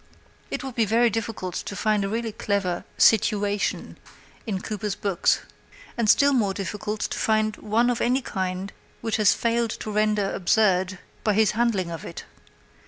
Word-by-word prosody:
It - - -4
would 265 -1 -5
be 230 -1 +2
very 230 +3 +3
difficult 220 -4 -3
to 205 - -5
find 210 0 +1
a 195 - -2
really 225 +1 -2
clever 200 -4 -2
"situation" 205 -2 +2 0.5
in 195 -4 -1
Cooper's 210 -1 -4
books, 195 -4 +1 0.5
and 230 -3 0
still 280 +4 +5
more 205 -7 +1
difficult 210 +2 -4
to - - -2
find 215 -1 +1
one 225 +3 +1
of 245 -1 0
any 255 +2 +1
kind 190 -1 -3 0.3
which 225 -2 -1
he - - -1
has 205 - +5
failed 235 0 0
to 215 - -5
render 210 -1 +1
absurd 185 -1 +2 0.3
by 210 - +2
his 220 -1 +4
handling 210 -6 0
of 165 - -6
it. - - -8
210 Hz, 170 wpm, -25 LUFS, 195-225 Hz, 0.5 s, still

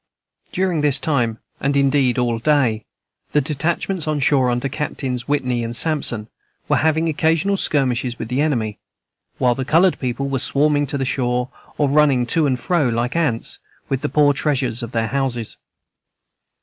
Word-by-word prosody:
During 180 -4 0
this 145 -2 +3
time, 120 -7 0 0.2
and 140 +1 0
indeed 135 -3 +2
all 120 -2 0
day, 120 -6 +1 0.5
the 150 - +4
detachments 160 +4 -2
on 155 -1 0
shore, 135 -2 +3
under 120 +2 -1
Captains 130 -3 -4
Whitney 125 -4 0
and 115 +1 -4
Sampson, 130 -9 0 0.4
were - - +2
having 160 +1 +2
occasional 160 +5 +1
skirmishes 125 -8 0
with 115 - -5
the 125 +4 0
enemy, 115 -9 -1 0.6
while 125 -1 +3
the 130 - -3
colored 170 +7 +3
people 130 +2 -2
were 135 -1 -1
swarming 145 +2 +1
to 140 - -2
the 135 - -1
shore, 125 -1 -1 0.3
or 145 - +2
running 140 -3 +3
to 155 +5 +1
and 130 -2 0
fro 170 -4 +1
like 120 +3 -1
ants, 150 -9 -1 0.3
with 135 -1 -1
the - - -2
poor 145 +1 +4
treasures 130 -5 -1
of 115 -1 -6
their 115 -2 -1
houses. 130 -5 -1
135 Hz, 165 wpm, -20 LUFS, 125-150 Hz, 0.6 s, the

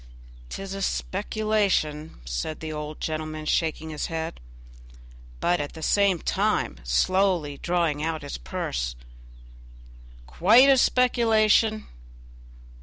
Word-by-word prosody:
"'Tis 195 0 -6
a 195 - -5
speculation," 195 - -1
said 60 - -4
the 155 -1 -5
old 150 0 -6
gentleman, 155 0 -4
shaking 160 0 -1
his 150 - -3
head, 165 0 -4 1.0
but 175 0 +1
at 145 - -6
the 160 - -9
same 200 -1 +3
time 65 - -1
slowly 165 - +1
drawing 170 -4 0
out 160 -1 -2
his 145 - -6
purse, - - -3 1.3
"quite 220 - +5
a 270 - +6
speculation! 225 -4 +3
165 Hz, 110 wpm, -25 LUFS, 150-200 Hz, 1.3 s, a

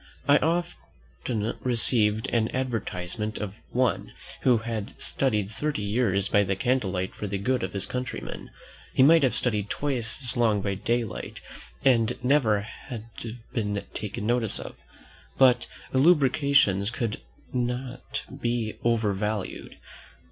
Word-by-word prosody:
I 145 +1 +7
once 115 - -3
received 110 -3 +2
an 115 -2 +2
advertisement 110 -4 -2
of 105 -3 -4 0.2
one 125 -3 0 0.3
"who 125 -3 +4
had 110 -2 -5
studied 105 -7 0
thirty 145 -1 -2
years 100 -2 +1
by 105 +1 +4
candle 125 0 +1
light 95 0 -2
for 105 - -5
the 100 0 -2
good 125 +6 0
of 95 0 -3
his 100 -1 0
countrymen." 125 0 -5 0.5
He 130 - +6
might 165 +4 +7
have 130 -4 +2
studied 105 -5 +1
twice 130 -6 0
as 120 - +5
long 110 -4 +3
by 100 - 0
daylight 115 +2 -2 0.5
and 115 -4 +3
never 125 -6 +3
have 115 +2 -8 0.5
been 105 -3 -2
taken 105 +1 -4
notice 120 -2 +2
of. - - -8 0.6
But 125 -2 +5 0.3
elucubrations 135 - +4
cannot 125 +2 -4 0.2
be 120 -2 -1
over 115 -3 +2
valued. 105 0 -3
115 Hz, 125 wpm, -26 LUFS, 105-130 Hz, 0.6 s, I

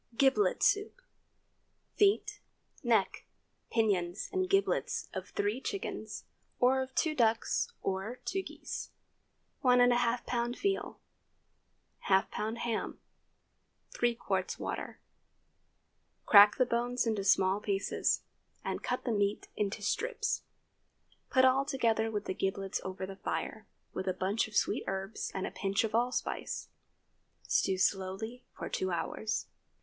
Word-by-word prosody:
GIBLET 275 +10 +3
SOUP. 415 +4 +2 0.9
Feet, 405 0 +2 0.4
neck, - - +1 0.4
pinions, 195 -5 0
and 370 -1 0
giblets 390 0 +1
of - - -5
three 210 +6 -1
chickens, 395 +7 -4 0.4
or 260 +2 +4
of 260 0 -6
two 315 - +2
ducks 230 -5 +1
or 195 +5 -2
two 385 - -1
geese. - - -6 0.7
1½ 245 -1 +6 0.3
lb. 240 0 -1
veal. 395 -1 -1 1.1
½ 190 0 +4
lb. 220 +2 -3
ham. 235 -1 -2 0.9
3 240 -1 +1
qts. - - -2
water. - - -5 1.3
Crack 205 0 +9
the 255 - +4
bones 245 +1 0
into 215 -3 0
small 195 0 +4
pieces, 200 -2 0 0.4
and - - -2
cut - - -2
the 245 - 0
meat 205 -1 0
into 205 0 -2
strips. 445 - -1 0.9
Put 260 -1 +5
all 260 +1 +4
together 230 -6 +1
with 210 -2 -3
the - - -2
giblets 195 0 -2
over 190 0 -4
the 190 0 -8
fire, - - -4 0.3
with 190 - -4
a 185 - +1
bunch 195 +5 0
of 215 - -12
sweet - - +2
herbs 195 +2 -3
and 190 - -1
a - - -4
pinch 195 +2 0
of 220 -1 -2
allspice. 245 +2 -1 0.7
Stew 190 -1 +1
slowly 195 +5 -1
for - - -6
two 185 - -1
hours. 180 +5 -2
225 Hz, 125 wpm, -32 LUFS, 195-255 Hz, 1.3 s, Crack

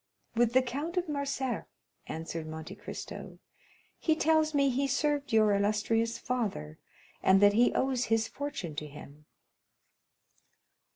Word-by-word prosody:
"With 235 0 +2
the 260 0 +5
Count 290 +8 -4
of 360 -1 +1
Morcerf," 275 -4 -2 0.4
answered 160 0 -5
Monte 160 0 -7
Cristo. - - -8 0.6
"He 315 - +2
tells 315 -1 +2
me 280 -1 +4
he 270 +2 +1
served 285 0 0
your 215 -2 +5
illustrious 215 +3 +1
father, 205 - -3 0.4
and 190 +1 +5
that 205 0 +6
he 240 +3 +4
owes 260 -2 +1
his 225 0 +1
fortune 285 - -5
to 150 - -4
him." 150 0 -12
240 Hz, 130 wpm, -30 LUFS, 200-280 Hz, 0.6 s, that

